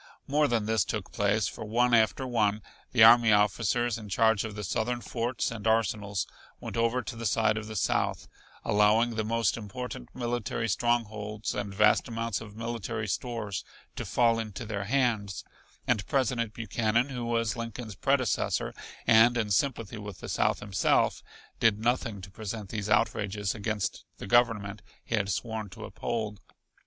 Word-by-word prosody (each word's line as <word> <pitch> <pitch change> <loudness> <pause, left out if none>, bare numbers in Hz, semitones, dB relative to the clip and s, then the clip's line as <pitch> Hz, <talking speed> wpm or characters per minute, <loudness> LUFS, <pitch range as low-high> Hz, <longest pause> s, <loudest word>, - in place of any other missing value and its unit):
More 150 +1 +2
than 115 -4 0
this 110 -3 +2
took 100 -2 -4
place, 100 -1 +1
for - - -6
one 120 +3 +2
after 115 +3 +3
one 110 -4 +1 0.3
the 115 -3 +6
army 115 0 +8
officers 115 +3 +2
in 105 -2 -9
charge 110 +1 +3
of 110 -2 -6
the 105 - -5
Southern 120 +5 -1
forts 120 0 -2
and 115 -2 -4
arsenals 105 -3 +1 0.3
went - - -6
over 115 +2 +1
to 110 - -6
the 115 -1 -2
side 110 +1 +2
of 110 -1 -4
the 110 - -7
South, 95 - 0 0.4
allowing 105 +3 +4
the 110 -1 -1
most 115 +2 +1
important 110 - -6
military 120 -2 -2
strongholds 110 -1 -1
and 105 -1 -3
vast 105 +2 +4
amounts 115 -2 -2
of 105 -2 -10
military 115 -1 -4
stores 110 -3 -3 0.3
to - - -4
fall 115 -2 +2
into 110 0 -5
their 100 -2 -3
hands, 115 -5 0 0.4
and 100 - 0
President 120 -4 0
Buchanan, 115 +2 0
who 125 -3 -4
was 115 -2 0
Lincoln's 115 -1 -6
predecessor, 130 +1 0 0.3
and 115 +1 +6
in 110 -3 -1
sympathy 115 0 0
with 105 -3 -8
the - - -7
South - - +1
himself, 100 -2 +1 0.4
did 115 -3 +4
nothing 115 -3 -1
to 95 +1 -10
prevent 105 0 -6
these 105 -2 -3
outrages 105 -2 +1
against 105 -1 -3
the - - -7
Government 105 -2 +2 0.2
he - - -6
had 100 -3 +1
sworn 110 -1 -3
to 90 - -9
uphold. 110 -3 -4
110 Hz, 165 wpm, -29 LUFS, 105-115 Hz, 0.4 s, army